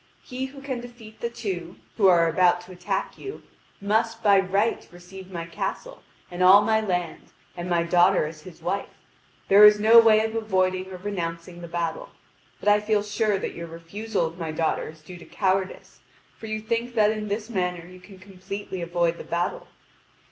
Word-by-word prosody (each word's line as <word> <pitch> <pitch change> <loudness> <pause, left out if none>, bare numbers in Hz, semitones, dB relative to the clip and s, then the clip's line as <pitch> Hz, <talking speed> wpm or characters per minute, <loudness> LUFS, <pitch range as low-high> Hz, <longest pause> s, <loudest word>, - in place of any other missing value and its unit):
He 255 +1 -5
who 275 0 -13
can 260 -3 -4
defeat 235 -3 -13
the 235 - -1
two, 185 -7 -5 0.2
who 200 -4 +4
are 170 -2 +5
about 175 +1 +3
to 180 +1 -14
attack 190 +2 -4
you, 400 +1 -8 0.4
must 225 +3 0
by 200 -2 +6
right 195 +4 0
receive 180 +2 -12
my 170 -2 -5
castle, - - -5 0.3
and 175 +1 -5
all 190 +3 +8
my 220 +1 +2
land, 180 -4 -3 0.3
and 175 +1 -5
my 170 -1 +2
daughter 175 0 +3
as 155 0 -8
his 165 -1 -14
wife. 195 +3 -2 0.6
There 200 +2 +7
is 210 0 +8
no 225 +2 +8
way 220 -1 +5
of 220 - -4
avoiding 185 -4 0
or 185 - -7
renouncing 175 -2 -5
the 170 - -7
battle. 170 -1 -3 0.5
But - - +1
I 205 0 +5
feel 210 0 0
sure 210 0 0
that - - -4
your 170 0 -7
refusal 170 +5 -3
of 165 +2 -7
my 165 -2 -3
daughter 160 0 -1
is 155 0 -14
due 175 +3 -11
to - - -13
cowardice, 190 -1 -2 0.4
for 220 - -10
you 215 0 -3
think 230 +2 -3
that 215 -1 +4
in 215 -1 -4
this 210 +2 -3
manner 180 -6 -2
you 185 +1 -13
can 190 +1 -15
completely 190 0 -7
avoid 170 0 0
the - - -7
battle. 170 +1 -3
190 Hz, 190 wpm, -25 LUFS, 175-215 Hz, 0.6 s, all